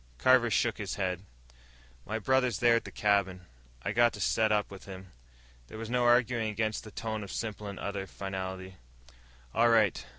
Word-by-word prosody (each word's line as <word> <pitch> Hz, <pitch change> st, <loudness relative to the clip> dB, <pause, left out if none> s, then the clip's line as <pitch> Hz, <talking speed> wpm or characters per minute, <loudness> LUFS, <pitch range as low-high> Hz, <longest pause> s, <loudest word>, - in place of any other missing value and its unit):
Carver 125 Hz, -, +4 dB
shook 115 Hz, +1 st, +1 dB
his 100 Hz, -3 st, -3 dB
head. 90 Hz, -3 st, -2 dB, 0.9 s
"My 110 Hz, -, -2 dB
brother's 125 Hz, -1 st, +1 dB
there 120 Hz, +1 st, +4 dB
at -, -, -4 dB
the -, -, -8 dB
cabin. 100 Hz, -3 st, +1 dB, 0.4 s
I -, -, -1 dB
got 120 Hz, -1 st, +4 dB
to -, -, -8 dB
set 110 Hz, +3 st, +2 dB
up 105 Hz, -1 st, +1 dB
with 95 Hz, -, -10 dB
him." 95 Hz, -1 st, -10 dB, 0.6 s
There -, -, -10 dB
was 115 Hz, +1 st, -6 dB
no 125 Hz, -1 st, +2 dB
arguing 120 Hz, -2 st, +3 dB
against 110 Hz, 0 st, -2 dB
that 105 Hz, -, -12 dB
tone 110 Hz, -1 st, -3 dB
of 100 Hz, -, -8 dB
simple 105 Hz, -2 st, -4 dB
and 100 Hz, -1 st, -7 dB
utter 100 Hz, -1 st, -4 dB
finality. 95 Hz, -1 st, -6 dB, 0.8 s
"All 120 Hz, +1 st, +4 dB
right. 110 Hz, -, +3 dB
105 Hz, 185 wpm, -30 LUFS, 95-115 Hz, 0.9 s, Carver